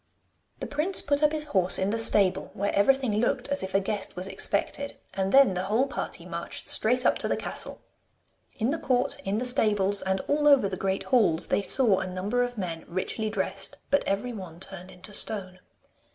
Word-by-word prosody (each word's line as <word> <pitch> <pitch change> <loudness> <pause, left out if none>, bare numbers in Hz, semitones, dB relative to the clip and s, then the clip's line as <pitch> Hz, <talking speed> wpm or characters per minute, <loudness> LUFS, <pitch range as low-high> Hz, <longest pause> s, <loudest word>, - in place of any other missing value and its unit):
The - - -2
prince 315 +7 +1
put 285 0 0
up 300 -1 +4
his 310 -1 -1
horse 190 -11 +2
in 190 +1 0
the 225 - 0
stable, 200 -4 +3
where 200 0 -1
everything 255 +1 +2
looked 245 +3 0
as 280 0 -1
if 190 0 -5
a - - +5
guest 200 0 -3
was 185 +1 -2
expected, 280 +7 -2 0.2
and 195 0 -1
then 270 -7 +6
the 180 +1 -3
whole 220 +7 +2
party 275 - -5
marched - - -6
straight 250 +3 +2
up - - +3
to - - -1
the - - 0
castle. - - -2 0.7
In 230 +3 0
the 320 - -2
court, 250 -1 0
in 195 +2 -1
the 245 - -1
stables, 205 -5 +3
and 190 0 -1
all 295 +1 0
over 275 -8 +6
the 190 - -4
great 190 +1 -2
halls, 210 -11 +2
they - - +2
saw 210 -2 +3
a - - -4
number 190 +7 -2
of 245 -1 -2
men 170 -4 -4
richly 190 +5 -3
dressed, 195 -1 -3
but 285 - +3
every 205 +5 -2
one 180 -6 -9
turned 190 -1 -6
into 190 +3 -7
stone. 185 -4 -1
205 Hz, 205 wpm, -27 LUFS, 190-250 Hz, 0.7 s, then